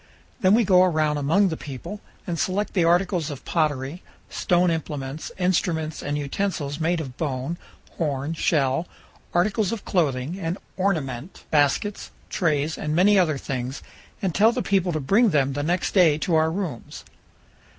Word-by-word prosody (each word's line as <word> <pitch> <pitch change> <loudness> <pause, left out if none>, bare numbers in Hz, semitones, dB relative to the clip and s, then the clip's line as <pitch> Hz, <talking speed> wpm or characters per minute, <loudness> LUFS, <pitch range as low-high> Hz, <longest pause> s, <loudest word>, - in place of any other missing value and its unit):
Then 190 +2 +5
we 235 - +4
go 185 -3 +5
around 155 -4 +2
among 185 +8 +3
the 160 - -2
people 150 - -8 0.2
and 170 -3 -3
select 200 +3 -1
the 180 - +2
articles 175 -1 +2
of 140 -3 -8
pottery, 150 0 -1 0.3
stone 175 -1 +2
implements, 150 -2 -4
instruments 170 -4 0
and 145 +1 -2
utensils 145 -1 -2
made 165 +2 +1
of 130 -5 -7
bone, 145 +2 -3 0.4
horn, 145 -1 -1
shell, 150 -1 +1 0.4
articles 195 +3 +1
of 230 -3 -5
clothing 155 0 0
and 170 0 -2 0.2
ornament, 160 -6 -2
baskets, 150 +7 +1 0.2
trays, 155 -3 0
and 150 0 -2
many 195 +3 +5
other 155 -6 +2
things, 130 0 -4 0.4
and 185 -3 0
tell 220 +3 +5
the - - -2
people 190 -2 +1
to 155 - -1
bring 205 - +3
them 140 -5 +2
the 145 - -2
next 175 +4 0
day 170 -6 +5
to 165 +2 -1
our 160 0 +4
rooms. 165 - -5
160 Hz, 160 wpm, -24 LUFS, 145-185 Hz, 0.4 s, Then